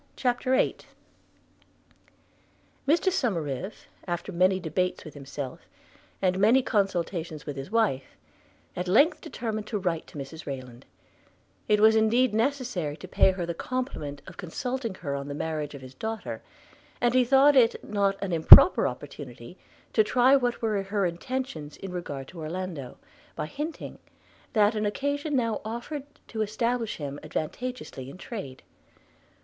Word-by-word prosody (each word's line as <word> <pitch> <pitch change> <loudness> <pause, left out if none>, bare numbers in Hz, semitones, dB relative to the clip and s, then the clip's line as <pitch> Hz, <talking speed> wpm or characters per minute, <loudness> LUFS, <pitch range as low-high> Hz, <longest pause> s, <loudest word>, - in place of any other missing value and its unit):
CHAPTER 255 0 +1
VIII - - +2 2.1
MR 345 +6 +3
SOMERIVE, 190 - -2 0.2
after 175 +3 -3
many 185 +1 +3
debates 180 +2 -2
with 155 - -9
himself, 140 -2 -7 0.6
and 185 0 +2
many 235 +6 +5
consultations 175 - -1
with 145 - -5
his 135 +2 -6
wife, 210 - 0 0.6
at 180 +1 -3
length 300 - +4
determined 215 -2 -4
to 215 - -2
write 175 -4 -2
to - - -11
Mrs 145 +4 -8
Rayland: 130 -3 -7 0.8
it 210 0 +4
was 220 +1 +6
indeed 225 +3 +3
necessary 225 - -1
to 185 - -10
pay 185 - +4
her 180 -2 -3
the 170 - -3
compliment 165 - -4
of - - -12
consulting 235 +5 -4
her 145 -6 -4
on 140 0 -4
the 145 - -5
marriage 150 -1 -3
of 135 - -10
his 130 0 -11
daughter; 220 +10 -5 0.6
and 240 0 +2
he 255 0 +5
thought 275 +3 +5
it 235 -3 +4
not 200 -1 +1
an 190 -3 -2
improper 160 -3 +9
opportunity 130 0 -8 0.4
to 220 - +5
try 250 +5 +4
what 245 -3 0
were 215 -3 +1
her 200 0 -1
intentions 175 - -4
in 195 - -7
regard 145 -7 -5
to 175 - -11
Orlando, 160 -4 -5 0.4
by - - -3
hinting, 300 - -6 0.5
that 210 0 +4
an 215 -1 0
occasion 285 +6 -1
now 230 -4 0
offered 240 +6 -5 0.2
to 220 - -3
establish 230 +2 -1
him 145 -1 -5
advantageously 155 - -5
in 140 - -10
trade. 185 - -7
195 Hz, 145 wpm, -27 LUFS, 155-240 Hz, 2.1 s, improper